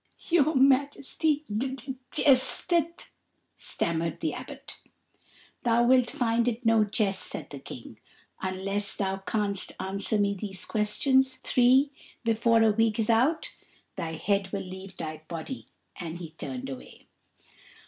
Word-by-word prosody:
"Your 315 -3 +4
Majesty 280 +3 +2 0.7
jesteth," 325 +5 +2 0.4
stammered 170 0 -2
the 320 - -1
Abbot. - - -9 0.8
"Thou 235 0 +3
wilt 250 -1 +4
find 235 -4 +1
it 240 +1 -2
no 225 -1 +5
jest," 200 -2 0
said - - -4
the - - -7
King. - - -10 0.4
"Unless 195 +2 -1
thou 195 -1 -1
canst 200 0 -1
answer 195 +3 -1
me 200 -1 +2
these 195 -1 -4
questions 260 +5 +2
three 260 +3 +4 0.3
before 230 0 +3
a 220 - +5
week 225 0 +2
is 225 0 +2
out, 260 +8 +2 0.4
thy 165 -1 -4
head 195 +4 0
will 200 -1 -3
leave 190 +1 -9
thy 155 -1 -5
body;" 170 +10 -6 0.3
and 170 -2 -5
he 170 -3 -8
turned 135 -5 -6
away. 135 -2 -10
220 Hz, 130 wpm, -28 LUFS, 190-260 Hz, 0.8 s, no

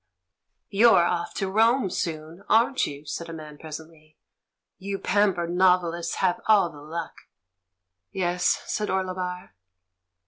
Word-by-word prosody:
"You're 205 -4 +6
off 170 0 -2
to 195 - -1
Rome 225 +1 +2
soon, 160 +2 -4
aren't 235 +5 +3
you?" 145 +1 -9
said 170 +3 -5
a - - -6
man 155 -2 -10
presently. 155 0 -11 0.6
"You 195 +1 -4
pampered 190 -4 +1
novelists 180 -2 +2
have 185 -2 0
all 205 -5 +4
the 145 - -13
luck!"' 165 +3 -7 0.8
"Yes," 180 -1 0
said 210 -1 -2
Orlebar. 185 - -3
180 Hz, 125 wpm, -25 LUFS, 165-195 Hz, 0.8 s, You're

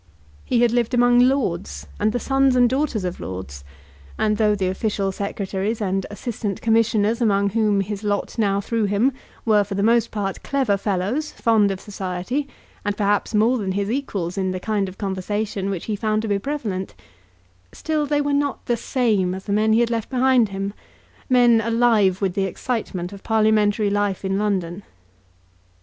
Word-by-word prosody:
He 240 -1 +2
had 240 - +3
lived 240 +1 +1
among 245 0 +5
lords, 245 -9 +1
and 210 +1 +2
the 245 - -1
sons 270 +1 +2
and 245 -1 +5
daughters 260 -5 -1
of 180 -1 -4
lords; 90 -8 -7 0.5
and 215 -1 +1
though 210 -1 +3
the 195 -2 -1
official 195 0 -1
secretaries 200 +2 -3
and 195 -2 -1
assistant 205 -2 -4
commissioners 225 0 +2
among 200 -3 +2
whom 210 -2 +2
his 205 +1 -5
lot 205 +2 -2
now 200 -2 +2
threw 225 +1 -1
him 205 +7 +2 0.3
were 210 -2 +4
for 200 0 -6
the 200 - 0
most 230 +1 +3
part 200 -2 -3
clever 265 -7 +1
fellows, 205 +9 -2
fond 220 -4 +3
of 195 -1 -3
society, 195 +8 -4 0.4
and 205 0 -2
perhaps 205 +1 0
more 235 +4 +3
than 190 -3 -2
his 200 +2 -1
equals 200 -9 -3
in 190 -1 0
the 185 0 -3
kind 205 -1 -1
of 185 - -13
conversation 200 +1 -3
which 190 -4 -4
he 215 - -2
found 215 +1 -1
to - - -2
be 200 -1 +1
prevalent, 205 -7 -4 0.8
still 310 -2 -2
they 290 0 +1
were 290 0 0
not 285 -1 -1
the 240 - 0
same 215 -9 0
as 190 - -7
the 200 - -1
men 215 +1 +2
he 225 +2 +4
had 235 0 +1
left 230 -2 -2
behind 255 -3 +3
him, 195 +1 -4 0.6
men 240 -3 +5
alive 225 -5 +2
with 190 -2 +1
the 195 0 0
excitement 190 -3 -3
of 200 - -10
parliamentary 215 -1 +2
life 205 -2 -1
in 195 +1 0
London. 190 -3 -1
210 Hz, 180 wpm, -22 LUFS, 195-235 Hz, 0.8 s, among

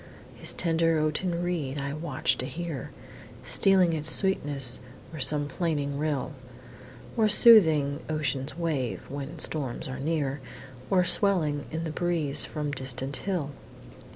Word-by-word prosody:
His - - -1
tender 165 -1 +1
oaten 170 +3 -1
reed 155 -6 -2
I 140 0 -3
watch 155 -3 0
to 130 - -1
hear, 160 -4 -5 0.5
Stealing 190 -3 +4
its 155 0 0
sweetness 145 -10 +2 0.3
o'er 155 - -6
some 145 +2 +1
plaining 145 -3 -2
rill, 150 -1 -1 0.8
Or 220 -2 +3
soothing 160 -11 +6
ocean's 145 -2 -2
wave, 150 -8 -2
when 145 +4 -6
storms 145 -5 -2
are 130 - -6
near, 145 -2 -1 0.5
Or 185 -2 +4
swelling 165 -8 0
in 160 +1 -4
the 160 - -3
breeze 155 -4 +1
from 150 -2 -4
distant 130 0 -2
hill! 175 -8 -2
155 Hz, 130 wpm, -27 LUFS, 140-170 Hz, 0.8 s, soothing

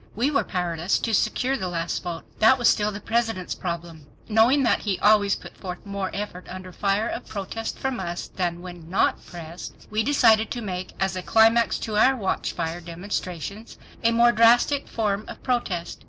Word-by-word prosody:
We 250 +7 +1
were 285 - +2
powerless 175 -1 -1
to 225 - -2
secure 255 +5 +1
the 190 - -3
last 170 -1 -2
vote. 175 -2 -5 0.2
That 225 +4 +6
was 240 - +2
still 210 0 +3
the 200 - -6
President's 225 -5 -1
problem. 170 -4 -6 0.2
Knowing 235 +6 +4
that 235 - +3
he 200 -4 -1
always 205 -1 +4
put - - -11
forth 180 +1 -8
more 200 -1 -3
effort 200 -3 -6
under 185 0 -8
fire 200 +4 0
of 240 - -5
protest 220 +2 -5
from 265 -2 -2
us 175 -2 -4
than 175 -1 -3
when 175 -3 -10
not 190 - +1
pressed, 170 0 -9 0.2
we 215 +1 +1
decided 225 -4 +4
to 240 - -4
make 185 -3 -5
as 190 -1 0
a 185 - -3
climax 225 +3 +4
to 215 -2 -2
our 260 +5 +5
watchfire 175 -5 -2
demonstrations 180 +3 -5 0.3
a 230 - +4
more 235 +1 +5
drastic 240 +5 +4
form 210 -2 -1
of - - -10
protest. 210 -9 -2
200 Hz, 185 wpm, -24 LUFS, 180-225 Hz, 0.3 s, That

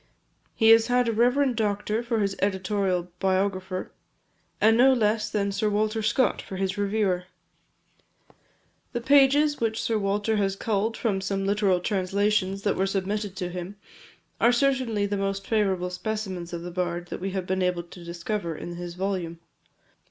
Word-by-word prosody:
He 225 -1 +4
has 225 0 +7
had 245 -1 +2
a - - +2
reverend 250 +3 +2
doctor 210 0 -1
for 235 -2 -1
his 195 -1 0
editorial 190 -2 0
biographer, 190 -1 -1 0.7
and 220 +1 +5
no 260 +3 +6
less 220 -2 +1
than 200 -1 -1
Sir 200 +2 0
Walter 215 +2 0
Scott 235 +4 +1
for 190 - -8
his 190 0 -1
reviewer. 200 -3 0 1.7
The 240 - -2
passages 285 +2 +4
which 225 -1 0
Sir 225 -2 0
Walter 205 +2 0
has 195 -1 0
culled 220 +2 -1
from 200 -5 -1
some 195 0 -2
literal 200 -2 +2
translations 195 +1 0
that 200 - +1
were 190 - +1
submitted 200 +1 -2
to 180 -2 -3
him, 180 +2 -6 0.6
are 235 - +5
certainly 245 -5 +1
the 205 0 -2
most 195 0 -2
favourable 190 -5 0
specimens 190 -3 -4
of 170 -1 -5
the 175 - -6
bard 175 -1 -3
that - - -6
we 195 - -2
have 190 -2 -2
been 190 +1 -1
able 180 -1 0
to 175 +1 -13
discover 170 +1 -4
in 175 +3 -7
his 175 -1 -6
volume. 180 -3 -3
200 Hz, 165 wpm, -26 LUFS, 185-220 Hz, 1.7 s, has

